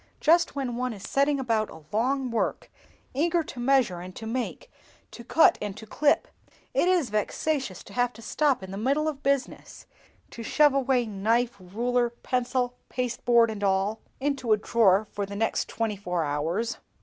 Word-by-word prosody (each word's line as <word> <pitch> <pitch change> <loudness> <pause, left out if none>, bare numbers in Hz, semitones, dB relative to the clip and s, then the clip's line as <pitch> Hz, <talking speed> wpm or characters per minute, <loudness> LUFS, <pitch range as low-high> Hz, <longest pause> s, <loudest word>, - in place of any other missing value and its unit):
"Just 335 0 +3
when 255 -4 -2
one 250 -1 -1
is 200 -3 -10
setting 280 +1 +2
about 225 -4 0
a 160 - -12
long 255 +3 +1
work, 230 - -2 0.4
eager 335 +5 +1
to 255 - -9
measure 245 -8 +2
and 185 +1 -9
to 225 - -7
make, 255 - -4 0.4
to 235 - -10
cut 330 +8 +4
and 205 -1 -4
to 220 - -9
clip, 290 +7 +2 0.5
it - - +2
is 350 - +2
vexatious 215 - -1
to 200 - -14
have 245 +1 +1
to 225 - -13
stop 285 -3 +1
in 190 - -8
the 195 - -5
middle 280 +7 +1
of 290 -3 -3
business, 275 0 -2 0.5
to 235 - -8
shove 295 +5 +4
away 260 -2 +2
knife, 225 +3 0
ruler, 240 +6 0
pencil, 250 +1 -1 0.2
pasteboard, 240 -2 +2
and 205 -1 -6
all, 195 +2 +1 0.2
into 270 -5 +1
a - - +3
drawer 215 -2 +3
for 200 -1 -3
the 200 - -7
next 225 +2 0
twenty 225 -2 -2
four 180 -4 -2
hours!" 165 +10 -2
240 Hz, 175 wpm, -27 LUFS, 210-275 Hz, 0.5 s, cut